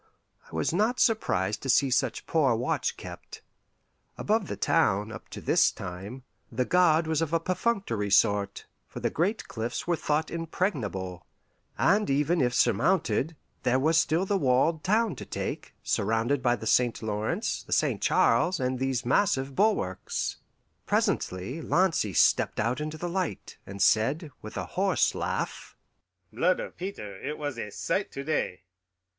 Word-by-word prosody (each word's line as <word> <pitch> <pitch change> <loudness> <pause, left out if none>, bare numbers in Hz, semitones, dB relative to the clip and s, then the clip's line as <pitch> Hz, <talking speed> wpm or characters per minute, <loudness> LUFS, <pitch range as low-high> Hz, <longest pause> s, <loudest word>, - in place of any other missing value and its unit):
I - - -8
was 80 - 0
not 220 +7 +1
surprised 105 - +1
to 135 - -5
see 130 +1 +4
such - - 0
poor 140 -7 +2
watch 120 +2 -1
kept. - - -10 0.7
Above 210 -2 0
the - - -4
town, 105 -10 +2
up - - -10
to - - -7
this - - +3
time, 100 +9 -8 0.3
the 125 +2 0
guard 170 -1 +4
was 160 0 0
of 165 0 -2
a 165 - +3
perfunctory 185 - -1
sort, 100 0 +2 0.2
for - - -8
the - - -1
great 195 +7 -1
cliffs 115 0 -4
were 175 - +1
thought 155 0 -1
impregnable; 135 - -3 0.5
and 205 +5 +3
even 150 +5 +2
if 125 -1 +2
surmounted, 140 - +2 0.3
there 125 +1 +2
was 155 +5 +2
still 160 +3 +2
the 195 0 0
walled 145 +3 +2
town 215 +1 +2
to - - -6
take, - - -5
surrounded 115 +6 0
by 120 -1 +2
the 115 - -8
St. 120 0 +2
Lawrence, 105 0 -2
the - - -16
St. - - +1
Charles, 170 +10 +3
and 130 0 -1
these 130 -3 -1
massive 135 -2 +1
bulwarks. 200 - 0 0.5
Presently 95 - -1
Lancy 165 - +1
stepped - - +3
out 120 +6 0
into 155 +1 -4
the 175 - -4
light, 180 -2 -4
and 100 +1 -8
said, 135 - +2
with - - -8
a - - -2
hoarse - - +1
laugh, - - -4 0.6
"Blood 170 +11 +2
of - - -6
Peter, 105 - -7
it 150 - -4
was 145 -5 -4
a 105 - -4
sight 195 - -2
to 140 - -5
day! 140 -11 -2
140 Hz, 160 wpm, -28 LUFS, 115-175 Hz, 0.7 s, see